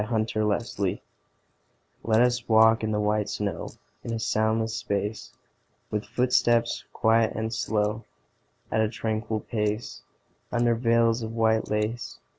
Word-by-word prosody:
VELVET 110 0 -1
SHOES 105 -2 -1 1.1
Let 110 0 +3
us 125 -1 0
walk 110 0 +5
in 110 - 0
the 105 - 0
white 105 0 0
snow 105 -1 -3 0.3
In 115 - -5
a 115 - -1
soundless 110 0 0
space; 105 +1 -3 0.6
With 105 0 -2
footsteps 120 0 +2
quiet 115 0 +2
and 110 +1 -2
slow, 110 -1 -1 0.7
At 110 - +2
a 110 - +1
tranquil 110 -1 -2
pace, 105 0 -3 0.5
Under 120 0 +2
veils 115 0 +2
of 110 0 -5
white 110 -1 +1
lace. 105 +3 -2
110 Hz, 130 wpm, -26 LUFS, 105-115 Hz, 1.1 s, walk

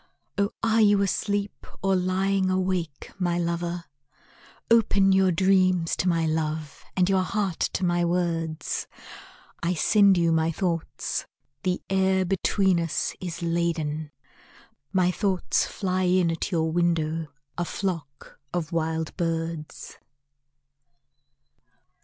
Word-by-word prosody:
Oh 200 0 +1
are 225 0 +3
you 205 -1 +5
asleep, 200 +1 -2 0.2
or 195 0 +3
lying 190 +1 +1
awake, 185 -5 -2
my 175 -2 +1
lover? 170 0 -2 0.9
Open 200 -4 +4
your 190 -1 +4
dreams 185 -1 +3
to 180 - +1
my 165 -1 +1
love 155 -1 -2
and 180 -1 +4
your 190 -1 +3
heart 190 -2 -2
to 185 - 0
my 175 0 +2
words, 165 -3 -1 0.7
I 175 +2 0
send 200 +3 +5
you 170 -1 +3
my 160 0 +2
thoughts 170 -1 -2 0.3
the 185 -2 -1
air 190 0 +2
between 190 0 +2
us 165 -2 -1
is 175 -2 -5
laden, 165 -3 -1 0.8
My 185 -2 +3
thoughts 190 -1 0
fly 185 -2 -1
in 180 -2 +3
at 165 +4 -3
your 160 -2 +1
window, 165 -2 0 0.3
a 175 - -1
flock 165 -7 -5
of 170 -4 -3
wild 160 -1 -2
birds. 165 -2 -4
175 Hz, 120 wpm, -26 LUFS, 165-190 Hz, 0.9 s, you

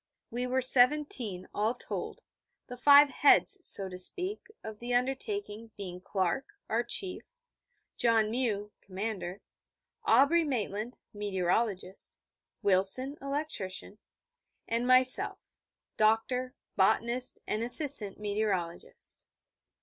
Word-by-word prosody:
We 245 +2 -3
were 260 +1 0
seventeen, 250 -7 +3
all 215 +4 -1
told, - - -6 0.4
the 250 - -9
five 285 +2 +6
Heads 290 +9 +4
(so 195 - +4
to 180 -1 -8
speak) 365 - -1 0.2
of 220 -1 -9
the 245 +1 -3
undertaking 255 - -3
being 180 -2 -8
Clark 195 - -3
(our 230 +2 0
Chief), 365 +10 -3 0.8
John 225 -2 +1
Mew 215 -4 -2
(commander), 195 -1 -6 0.6
Aubrey 330 +5 +4
Maitland 235 -4 -4 0.2
(meteorologist), 195 -1 -2 0.5
Wilson 200 +9 +2
(electrician), 275 -9 -5 0.7
and 235 +2 -1
myself 255 0 +4 0.6
(doctor, 250 +4 0 0.2
botanist, 235 +6 +1
and 215 - -2
assistant 240 -5 +4
meteorologist). 205 -5 -5
230 Hz, 100 wpm, -29 LUFS, 200-260 Hz, 0.8 s, five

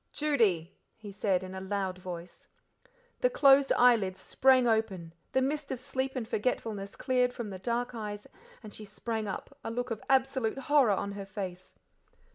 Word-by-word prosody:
"Judy," 215 - +1 0.2
he 215 -2 -9
said 195 -2 0
in 185 0 -7
a 190 - -6
loud 190 -1 -2
voice. 175 -1 -8 0.7
The - - +3
closed 275 - +5
eyelids 215 -7 +4
sprang 255 +4 +4
open, 200 -7 0 0.2
the 260 - +2
mist 290 +1 -2
of 260 - -2
sleep 260 +2 -3
and 240 -4 -3
forgetfulness 210 -3 -2
cleared 250 -2 +1
from 225 -4 -5
the 190 - -7
dark 240 +4 -2
eyes, 210 -2 -6 0.4
and 210 -2 -10
she 215 - -8
sprang 220 +1 -4
up, 200 +7 -6
a - - -4
look 245 +2 -3
of 225 - -3
absolute 265 -3 +2
horror 280 -2 +3
on 200 0 0
her 200 0 -6
face. 185 -3 -7
220 Hz, 170 wpm, -30 LUFS, 195-255 Hz, 0.7 s, closed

